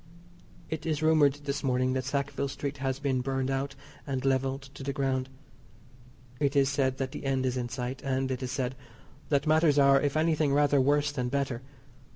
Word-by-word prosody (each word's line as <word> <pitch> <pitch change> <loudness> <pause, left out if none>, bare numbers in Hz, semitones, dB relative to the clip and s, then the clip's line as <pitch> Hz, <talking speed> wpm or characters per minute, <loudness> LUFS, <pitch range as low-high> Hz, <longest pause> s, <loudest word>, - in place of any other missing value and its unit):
It 160 -1 -4
is 155 -1 -1
rumoured 155 -3 +5
this 140 0 -3
morning 130 -1 +1
that 130 0 -1
Sackville 140 0 -1
Street 140 +1 -4
has 135 -1 -1
been 135 -2 0
burned 135 0 -1
out 135 +1 -2 0.3
and 135 -1 -2
levelled 135 +1 +1
to 135 - -10
the 140 +1 -3
ground. 130 -1 -1 1.1
It 140 -1 +1
is 135 -1 +4
said 135 -2 0
that 135 -1 -3
the - - -7
end 135 -1 0
is 130 -1 0
in 120 -1 -2
sight; 125 +1 -4
and, 135 -1 -1
it 130 0 -3
is 125 -1 -3
said, 130 -2 -1 0.6
that 140 0 +2
matters 155 -1 +4
are, 140 -1 +6
if 145 +1 0
anything 155 -3 +2
rather 145 -1 +4
worse 145 +2 +2
than 125 -4 -2
better. 135 -3 -1
135 Hz, 195 wpm, -29 LUFS, 130-145 Hz, 1.1 s, are